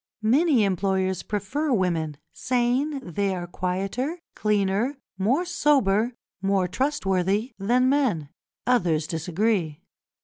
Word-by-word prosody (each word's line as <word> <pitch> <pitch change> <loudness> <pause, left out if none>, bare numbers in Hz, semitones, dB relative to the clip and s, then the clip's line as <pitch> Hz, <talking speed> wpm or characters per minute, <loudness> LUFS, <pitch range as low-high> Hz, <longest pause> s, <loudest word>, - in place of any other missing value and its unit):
Many 265 +2 +4
employers 190 -1 0
prefer 215 +10 -2
women, 170 - 0 0.2
saying 255 +4 0
they 195 +1 -1
are 175 -1 -4
quieter, 195 - -2 0.2
cleaner, 210 +5 +1 0.2
more 260 - +2
sober, 250 - +2 0.3
more 195 -1 +1
trustworthy, 200 - 0
than 245 +6 +3
men; 250 - +1 0.4
others 175 -11 +2
disagree. 170 0 -1
200 Hz, 100 wpm, -25 LUFS, 185-255 Hz, 0.4 s, Many